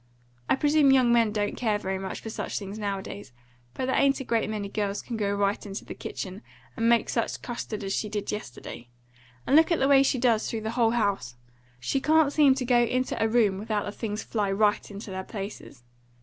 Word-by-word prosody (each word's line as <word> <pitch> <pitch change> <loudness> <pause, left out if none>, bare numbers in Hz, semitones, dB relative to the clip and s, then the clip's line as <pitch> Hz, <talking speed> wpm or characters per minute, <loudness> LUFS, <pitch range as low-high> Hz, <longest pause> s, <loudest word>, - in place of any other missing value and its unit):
I - - +5
presume 295 0 +4
young 255 -3 +5
men 230 -2 +4
don't 205 -1 -1
care 220 -4 0
very 190 -2 -3
much 190 0 -5
for 225 - -6
such - - -4
things 200 +1 -6
nowadays; 195 - -5 0.4
but 260 - -2
there 260 - 0
ain't 275 0 +3
a - - -4
great 230 -3 0
many 210 -2 -3
girls 205 0 -2
can 235 - -5
go 205 -2 0
right 200 0 0
into 200 0 -7
the - - -7
kitchen, 190 +2 -6 0.3
and 230 +1 +1
make 235 -1 +3
such - - -1
a - - -10
custard 230 -4 -5
as 195 0 -2
she 210 - -2
did 205 -1 -3
yesterday. 120 - -7 0.6
And 275 - +3
look 320 +2 +6
at 335 - +3
the 270 - +2
way 275 -1 +6
she 275 -1 +2
does, 235 -3 +2
through 225 - -3
the 220 +1 -3
whole 230 -1 +2
house! 195 - -1 0.4
She 195 - -1
can't 310 0 +3
seem 285 -4 +5
to 260 -2 -3
go 245 -1 +4
into 255 +2 0
a - - +3
room 220 -4 +2
without 210 -1 -2
the 205 - -4
things 210 0 -4
fly 205 -3 -1
right 210 +1 +1
into 205 0 -8
their 190 0 -4
places. 195 - -8
215 Hz, 225 wpm, -27 LUFS, 200-250 Hz, 0.6 s, look